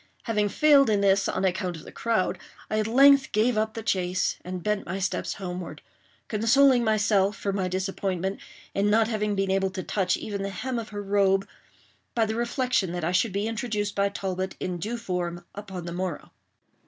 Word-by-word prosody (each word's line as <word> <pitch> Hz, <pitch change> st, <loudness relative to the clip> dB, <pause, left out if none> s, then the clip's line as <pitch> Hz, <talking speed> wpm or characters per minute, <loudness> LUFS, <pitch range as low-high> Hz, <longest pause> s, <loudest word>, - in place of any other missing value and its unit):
Having 210 Hz, -3 st, 0 dB
failed 285 Hz, 0 st, +5 dB
in 205 Hz, -2 st, +2 dB
this, 195 Hz, -1 st, +3 dB
on 190 Hz, -, -1 dB
account 185 Hz, -1 st, -1 dB
of 160 Hz, -, -11 dB
the -, -, -11 dB
crowd, 225 Hz, -5 st, 0 dB, 0.3 s
I 215 Hz, -, +1 dB
at 215 Hz, -, 0 dB
length 275 Hz, +3 st, +6 dB
gave 225 Hz, +3 st, +2 dB
up 220 Hz, 0 st, -1 dB
the 225 Hz, -, -5 dB
chase, 185 Hz, -2 st, 0 dB
and 180 Hz, -1 st, -6 dB
bent 210 Hz, -1 st, 0 dB
my 185 Hz, +2 st, -3 dB
steps 190 Hz, 0 st, -2 dB
homeward; 180 Hz, -2 st, -6 dB, 0.4 s
consoling 245 Hz, +4 st, +4 dB
myself 210 Hz, -2 st, +2 dB
for 200 Hz, -, -2 dB
my 190 Hz, -2 st, -1 dB
disappointment 190 Hz, 0 st, -2 dB, 0.3 s
in 200 Hz, +1 st, +1 dB
not 220 Hz, +1 st, +3 dB
having 210 Hz, -2 st, -1 dB
been 195 Hz, -1 st, 0 dB
able 190 Hz, 0 st, +1 dB
to 185 Hz, 0 st, -5 dB
touch 185 Hz, -3 st, 0 dB
even 200 Hz, -2 st, -5 dB
the 195 Hz, -, -2 dB
hem 245 Hz, +5 st, -3 dB
of 225 Hz, -, -7 dB
her 205 Hz, -1 st, -5 dB
robe, 195 Hz, -1 st, +2 dB, 0.7 s
by 230 Hz, -2 st, +3 dB
the 220 Hz, -, -2 dB
reflection 235 Hz, -, 0 dB
that 175 Hz, -1 st, -3 dB
I 170 Hz, -, 0 dB
should 190 Hz, +4 st, +2 dB
be 200 Hz, +3 st, -1 dB
introduced 215 Hz, -2 st, -2 dB
by 200 Hz, 0 st, +1 dB
Talbot, 190 Hz, -2 st, -3 dB
in 180 Hz, -1 st, -3 dB
due 225 Hz, +7 st, -3 dB
form, 175 Hz, -5 st, -4 dB
upon 190 Hz, -4 st, -7 dB
the 170 Hz, -, -5 dB
morrow. 180 Hz, -3 st, -4 dB
200 Hz, 195 wpm, -26 LUFS, 185-220 Hz, 0.7 s, length